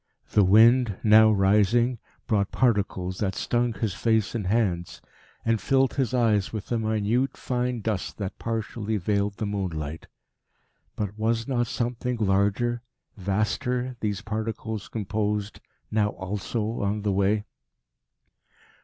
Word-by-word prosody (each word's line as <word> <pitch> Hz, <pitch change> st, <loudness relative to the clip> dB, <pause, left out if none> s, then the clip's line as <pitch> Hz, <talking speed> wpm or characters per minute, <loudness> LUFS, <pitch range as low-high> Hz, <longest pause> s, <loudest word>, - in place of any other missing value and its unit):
The 105 Hz, -, +5 dB
wind, 110 Hz, +2 st, +5 dB
now 110 Hz, 0 st, +7 dB
rising, 105 Hz, +5 st, +3 dB, 0.3 s
brought 100 Hz, -3 st, 0 dB
particles 100 Hz, -6 st, 0 dB
that 95 Hz, -3 st, -1 dB
stung 120 Hz, -1 st, 0 dB
his 110 Hz, -3 st, -2 dB
face 110 Hz, 0 st, +1 dB
and 105 Hz, -6 st, -2 dB
hands, 95 Hz, -5 st, 0 dB, 0.5 s
and 115 Hz, -2 st, +1 dB
filled 135 Hz, -1 st, +2 dB
his 130 Hz, -4 st, 0 dB
eyes 110 Hz, -6 st, +2 dB
with 110 Hz, -1 st, -6 dB
a 120 Hz, -, +1 dB
minute 110 Hz, +4 st, 0 dB
fine 125 Hz, -1 st, -2 dB
dust 105 Hz, -3 st, -3 dB
that 100 Hz, -2 st, -5 dB
partially 110 Hz, -1 st, -2 dB
veiled 100 Hz, +1 st, 0 dB
the 110 Hz, -, -2 dB
moonlight. 80 Hz, -7 st, -4 dB, 0.9 s
But 105 Hz, 0 st, -4 dB
was 115 Hz, +1 st, 0 dB
not 120 Hz, -3 st, 0 dB
something 120 Hz, +1 st, -2 dB
larger, 105 Hz, +4 st, +1 dB, 0.3 s
vaster 120 Hz, +6 st, -1 dB
these 105 Hz, -2 st, -2 dB
particles 110 Hz, -1 st, -4 dB
composed 105 Hz, -1 st, -2 dB, 0.3 s
now 105 Hz, -1 st, +2 dB
also 105 Hz, +4 st, -3 dB
on 100 Hz, +1 st, -1 dB
the 105 Hz, -2 st, +1 dB
way? 100 Hz, +2 st, +2 dB
110 Hz, 125 wpm, -26 LUFS, 100-115 Hz, 0.9 s, now